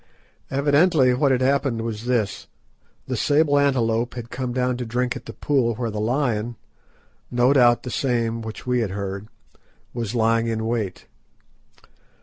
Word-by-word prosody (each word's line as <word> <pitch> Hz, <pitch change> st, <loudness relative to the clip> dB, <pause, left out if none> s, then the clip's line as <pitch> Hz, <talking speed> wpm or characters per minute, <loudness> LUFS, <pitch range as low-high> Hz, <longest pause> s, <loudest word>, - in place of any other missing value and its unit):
Evidently 145 Hz, 0 st, +3 dB
what 135 Hz, +2 st, +2 dB
had 130 Hz, -1 st, +2 dB
happened 135 Hz, -3 st, +1 dB
was 115 Hz, -1 st, -5 dB
this: 110 Hz, -6 st, -1 dB, 0.6 s
The -, -, -3 dB
sable 145 Hz, -1 st, +3 dB
antelope 120 Hz, -4 st, +1 dB
had 120 Hz, -1 st, -7 dB
come 125 Hz, 0 st, -3 dB
down 125 Hz, 0 st, 0 dB
to 125 Hz, -, -4 dB
drink 125 Hz, +2 st, -1 dB
at -, -, -9 dB
the -, -, -5 dB
pool 125 Hz, -6 st, 0 dB
where 115 Hz, -1 st, -3 dB
the 105 Hz, -, -4 dB
lion—no 120 Hz, +1 st, -2 dB
doubt 120 Hz, -3 st, +4 dB
the 125 Hz, -, -5 dB
same 115 Hz, -2 st, -1 dB
which 110 Hz, -1 st, -8 dB
we 125 Hz, -1 st, +1 dB
had 115 Hz, -4 st, -1 dB
heard—was 100 Hz, +3 st, -7 dB
lying 115 Hz, 0 st, +2 dB
in 110 Hz, -1 st, -2 dB
wait. 110 Hz, -5 st, -3 dB
120 Hz, 145 wpm, -23 LUFS, 115-130 Hz, 0.6 s, doubt